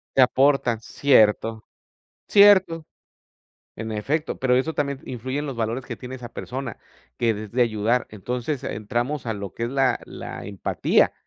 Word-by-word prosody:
Te 135 - +6
aportan, 130 -2 +3
cierto. 110 -4 +3 0.7
Cierto. 190 -6 +6 0.9
En 110 0 -4
efecto, 145 +9 -2
pero 125 -1 +2
eso 135 +5 0
también 140 -3 -2
influye 130 +2 -4
en 145 - -2
los 135 - -4
valores 115 +3 -2
que 120 -4 -6
tiene 125 +2 -8
esa 120 -2 -8
persona 130 -2 -6 0.4
que 115 -1 +2
desee 110 +4 -4
ayudar. 115 +2 +1
Entonces 125 +6 -4
entramos 120 +6 -3
a 115 - -1
lo 100 -2 -6
que 115 - -4
es - - -2
la 135 -2 +1
la - - -8
empatía, 100 -1 +1
125 Hz, 155 wpm, -24 LUFS, 110-135 Hz, 0.9 s, Te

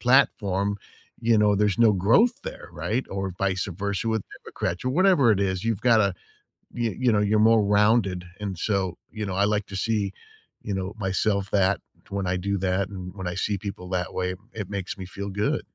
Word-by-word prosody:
platform, 100 -6 +2 0.4
you 115 -1 +3
know, 105 -1 +4
there's 105 0 +1
no 115 - +7
growth 115 - +3
there, - - -8
right? 120 +5 -2
Or 95 -1 -3
vice 95 -1 0 0.2
versa 100 +2 -1
with 110 -2 0 0.2
Democrats 90 +7 -4
or 130 - +1
whatever 155 - +5
it 100 - 0
is. 95 -1 -1
You've 115 -3 0
gotta, 110 -6 +4 0.6
you 120 -1 -1
you 125 -3 +3
know, 105 - +3
you're 105 +2 +4
more 115 -2 +5
rounded. 100 -3 +3 0.2
And 95 -4 -4
so, 95 -4 0
you 110 -1 -4
know, 95 - -3
I 100 +1 +2
like 105 -1 0
to 95 - -6
see, 100 -1 0 0.5
you 105 - -4
know, 95 +2 -3
myself 100 +1 0
that 100 -1 +3 0.3
when 100 -1 -2
I 90 0 0
do 100 +2 -1
that 95 +1 0
and 90 -2 -7
when 95 - -5
I 90 - -3
see 100 +1 -1
people 95 -2 -7
that 90 0 -2
way, 90 0 -1 0.2
it 105 -3 -5
makes 100 -1 -4
me 95 - -5
feel 100 +2 -6
good. 105 +2 0
100 Hz, 200 wpm, -25 LUFS, 95-110 Hz, 0.6 s, no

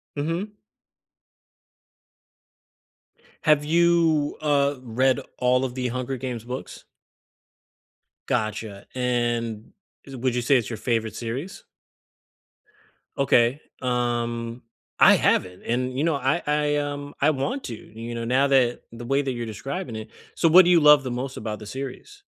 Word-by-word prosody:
Mhm. 165 +8 -3 2.9
Have 150 -2 +4
you, 165 -2 +2
uh, 145 -2 +2
read 130 +1 +1 0.2
all 125 +1 +2
of 125 -1 -5
the 125 -1 -2
Hunger 130 +2 -3
Games 125 -3 -5
books? 125 +2 -7 1.4
Gotcha, 110 -3 -3
and 120 -3 -1 0.3
is 135 - -10
it 125 - -9
would 130 -1 +1
you 125 - 0
say 130 +4 +3
it's 120 - -2
your 115 - -5
favorite 115 -2 -1
series? 130 +11 -6 1.5
Okay, 130 0 +3 0.2
um, 120 -1 -2 0.4
I - - +8
haven't, 90 0 +1
and, 125 +2 -2
you 140 - +1
know, 165 -2 +2
I 140 +5 0
I, 150 0 +1
um, 145 0 -4
I 145 - +5
want 150 - -2
to, 120 - -5
you 115 +2 -9
know, 115 0 -4
now 130 +4 +3
that 130 -3 +2
the 115 +1 -9
way 135 +3 +1
that 135 -2 -2
you're 120 -2 -4
describing 120 - -5
it 110 0 -7 0.3
so, 165 - +3
what 180 +3 +8
do 180 - +4
you 170 -2 +6
love 150 -1 +7
the 130 - -4
most 130 +2 -4
about 105 -1 -5
the 105 - -9
series? 135 - -8
130 Hz, 145 wpm, -24 LUFS, 120-145 Hz, 2.9 s, I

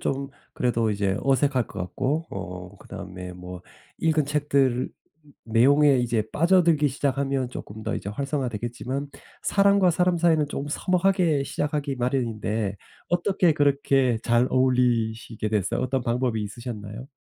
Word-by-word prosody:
좀 135 0 -2 0.2
그래도 115 -3 0
이제 100 -1 0
어색할 135 -3 +2
것 - - -8
같고 135 - -2
어 95 -1 -7
그다음에 90 0 -8
뭐 90 0 -9 0.4
읽은 160 -2 +2
책들 140 -3 +1 0.6
내용에 135 +5 +5
이제 120 -3 +1
빠져들기 170 -3 +4
시작하면 135 -1 -1
쪼끔 110 -3 -8
더 - - -2
이제 - - -6
활성화되겠지만 130 +1 -3 0.3
사람과 200 -2 +4
사람 180 +1 +2
사이는 165 -3 +3
좀 145 -1 -4
서먹하게 180 -2 +2
시작하기 145 -1 -2
마련인데 115 -5 -1 0.3
어떻게 175 -1 +2
그렇게 140 -4 +2
잘 120 +1 +3
어울리시게 120 -4 +1
됐어요? 105 -4 0
어떤 130 0 -1
방법이 120 -1 0
있으셨나요? 105 +2 -7
130 Hz, 325 characters per minute, -25 LUFS, 110-145 Hz, 0.6 s, 내용에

